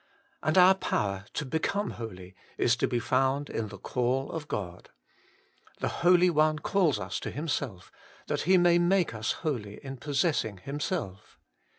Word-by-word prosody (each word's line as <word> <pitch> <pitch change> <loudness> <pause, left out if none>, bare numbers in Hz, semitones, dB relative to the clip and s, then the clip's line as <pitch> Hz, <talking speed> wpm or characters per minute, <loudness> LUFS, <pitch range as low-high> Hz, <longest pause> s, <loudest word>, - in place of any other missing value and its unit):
And 155 +4 +1
our 185 +1 +8
power 100 - -2
to 150 - -2
become 160 +9 -1
holy 95 -5 -8 0.2
is 115 - +3
to - - +1
be 125 - -1
found 135 +4 0
in 110 -1 -2
the 100 -1 -10
call 125 +5 -1
of 160 -3 -5
God: 90 -3 -5 0.9
the - - -1
Holy 180 +1 +5
One 155 -1 +3
calls 160 - +1
us 95 -1 -4
to - - -5
Himself, 140 - -4 0.3
that - - -1
He 190 - +7
may 175 -1 +5
make 175 -4 +2
us 110 -1 -1
holy 110 -9 -2
in 135 0 -6
possessing 140 - 0
Himself. 140 - -5
140 Hz, 160 wpm, -28 LUFS, 110-170 Hz, 0.9 s, our